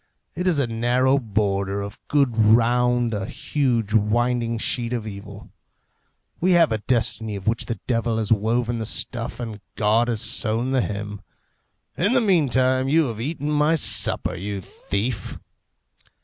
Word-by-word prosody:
It 180 Hz, +3 st, -3 dB
is 175 Hz, -4 st, +2 dB
a 140 Hz, -, +2 dB
narrow 120 Hz, +4 st, +1 dB
border 100 Hz, -3 st, -1 dB
of 100 Hz, +2 st, -8 dB
good 140 Hz, -5 st, +2 dB
round 120 Hz, +2 st, +3 dB
a 100 Hz, -1 st, -3 dB
huge 120 Hz, -8 st, -1 dB
winding 115 Hz, +2 st, +1 dB
sheet 120 Hz, +1 st, -1 dB
of 115 Hz, -3 st, -3 dB
evil. 100 Hz, -1 st, -9 dB, 0.9 s
We 185 Hz, +2 st, +3 dB
have 170 Hz, -5 st, +4 dB
a 110 Hz, -, 0 dB
destiny 110 Hz, -2 st, -1 dB
of 95 Hz, -1 st, -7 dB
which 115 Hz, +1 st, 0 dB
the 115 Hz, -5 st, -4 dB
devil 115 Hz, -2 st, 0 dB
has 110 Hz, -1 st, -2 dB
woven 115 Hz, +2 st, +1 dB
the 110 Hz, -, -3 dB
stuff 120 Hz, 0 st, -2 dB
and 110 Hz, -4 st, -6 dB
God 110 Hz, +2 st, +2 dB
has 115 Hz, -3 st, -1 dB
sewn 115 Hz, +2 st, +1 dB
the 130 Hz, -1 st, +2 dB
hem. 105 Hz, -1 st, -5 dB, 0.8 s
In 200 Hz, +7 st, +2 dB
the 260 Hz, -, +4 dB
meantime, 130 Hz, -, +2 dB
you 155 Hz, -2 st, +3 dB
have 110 Hz, -1 st, -6 dB
eaten 150 Hz, +2 st, -3 dB
my 150 Hz, +2 st, +3 dB
supper, 160 Hz, -, +1 dB
you 100 Hz, +3 st, -4 dB
thief!" 100 Hz, +3 st, -4 dB
115 Hz, 155 wpm, -23 LUFS, 105-130 Hz, 0.9 s, have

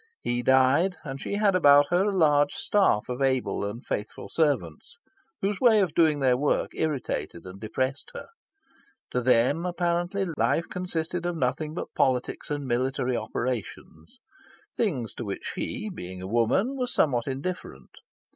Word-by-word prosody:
He 120 Hz, 0 st, -1 dB
died, 130 Hz, +8 st, +3 dB
and 135 Hz, -3 st, -6 dB
she -, -, -3 dB
had 205 Hz, -1 st, +3 dB
about 145 Hz, -4 st, +6 dB
her 180 Hz, +3 st, +3 dB
a 195 Hz, -, -2 dB
large 145 Hz, -3 st, +4 dB
staff 190 Hz, -, +2 dB
of 125 Hz, +2 st, -4 dB
able 130 Hz, -5 st, 0 dB
and 105 Hz, +5 st, -5 dB
faithful 105 Hz, +1 st, -5 dB
servants, 140 Hz, -, -1 dB, 0.5 s
whose 195 Hz, 0 st, -1 dB
way 230 Hz, -4 st, +6 dB
of 185 Hz, -6 st, +1 dB
doing 155 Hz, -3 st, +3 dB
their 130 Hz, -2 st, +4 dB
work 145 Hz, +3 st, 0 dB
irritated 140 Hz, -, -3 dB
and 95 Hz, +1 st, -10 dB
depressed 130 Hz, +6 st, -3 dB
her. -, -, -8 dB, 0.8 s
To 125 Hz, -, 0 dB
them, 130 Hz, +6 st, +3 dB
apparently, 175 Hz, +2 st, -1 dB
life 170 Hz, -, +1 dB
consisted 175 Hz, -1 st, -3 dB
of 175 Hz, -1 st, -2 dB
nothing 150 Hz, +3 st, -1 dB
but -, -, -6 dB
politics 125 Hz, -2 st, 0 dB
and 145 Hz, -1 st, -3 dB
military 130 Hz, +1 st, 0 dB
operations 110 Hz, -11 st, -5 dB, 0.6 s
things 135 Hz, -, -1 dB
to -, -, -6 dB
which 100 Hz, -3 st, -5 dB
she, -, -, -4 dB
being 95 Hz, -, -7 dB
a 95 Hz, -, -7 dB
woman, 120 Hz, -, +1 dB
was 250 Hz, -2 st, -2 dB
somewhat 125 Hz, -5 st, +1 dB
indifferent. 135 Hz, -, -5 dB
140 Hz, 155 wpm, -26 LUFS, 125-175 Hz, 0.8 s, about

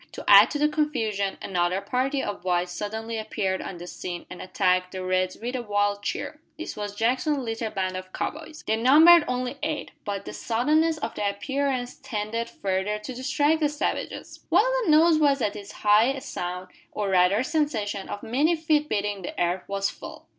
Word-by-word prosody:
To -, -, -8 dB
add -, -, +9 dB
to 295 Hz, -, -2 dB
the 300 Hz, +1 st, +3 dB
confusion, 225 Hz, -11 st, -1 dB
another 180 Hz, 0 st, 0 dB
party 265 Hz, +5 st, -1 dB
of 200 Hz, -3 st, -5 dB
whites 180 Hz, -1 st, 0 dB
suddenly 220 Hz, +4 st, -4 dB
appeared 190 Hz, -3 st, -2 dB
on 185 Hz, -, -6 dB
the 175 Hz, -, -8 dB
scene 175 Hz, 0 st, -6 dB
and 180 Hz, -, -8 dB
attacked 185 Hz, 0 st, 0 dB
the 185 Hz, -1 st, -4 dB
"Reds" 185 Hz, 0 st, 0 dB
with 245 Hz, +3 st, -4 dB
a 250 Hz, -, -2 dB
wild 205 Hz, -2 st, 0 dB
cheer. 205 Hz, +8 st, -4 dB, 0.2 s
This 325 Hz, -, -6 dB
was 205 Hz, -1 st, -5 dB
Jackson's 255 Hz, +7 st, +1 dB
little 225 Hz, -3 st, -3 dB
band 185 Hz, -2 st, -2 dB
of 185 Hz, 0 st, -7 dB
cow -, -, -2 dB
boys. 310 Hz, 0 st, -11 dB
They 220 Hz, -, +1 dB
numbered 310 Hz, +8 st, +7 dB
only 250 Hz, +2 st, -3 dB
eight; 305 Hz, -1 st, -3 dB
but 200 Hz, -2 st, -4 dB
the -, -, -7 dB
suddenness 305 Hz, +8 st, +1 dB
of -, -, -4 dB
their 205 Hz, -1 st, -1 dB
appearance 255 Hz, +4 st, -2 dB
tended 225 Hz, +2 st, -3 dB
further 195 Hz, +2 st, -2 dB
to 210 Hz, +5 st, -7 dB
distract 290 Hz, +5 st, +1 dB
the 300 Hz, -2 st, +2 dB
savages. 295 Hz, +1 st, -4 dB
While -, -, +5 dB, 0.2 s
the -, -, 0 dB
noise 315 Hz, +1 st, +5 dB
was 285 Hz, -2 st, +3 dB
at 210 Hz, -4 st, -1 dB
its 205 Hz, 0 st, -8 dB
height 215 Hz, +6 st, +3 dB
a 270 Hz, -, -6 dB
sound, 180 Hz, -2 st, -5 dB, 0.2 s
or 205 Hz, -2 st, -2 dB
rather 190 Hz, +4 st, +3 dB
sensation, 235 Hz, -10 st, -1 dB
of 205 Hz, -, -6 dB
many 290 Hz, +9 st, +2 dB
feet 310 Hz, -2 st, +1 dB
beating 205 Hz, -1 st, -1 dB
the 180 Hz, -, -6 dB
earth 175 Hz, +1 st, 0 dB
was 200 Hz, 0 st, -1 dB
felt. -, -, -11 dB
220 Hz, 195 wpm, -25 LUFS, 195-285 Hz, 0.2 s, add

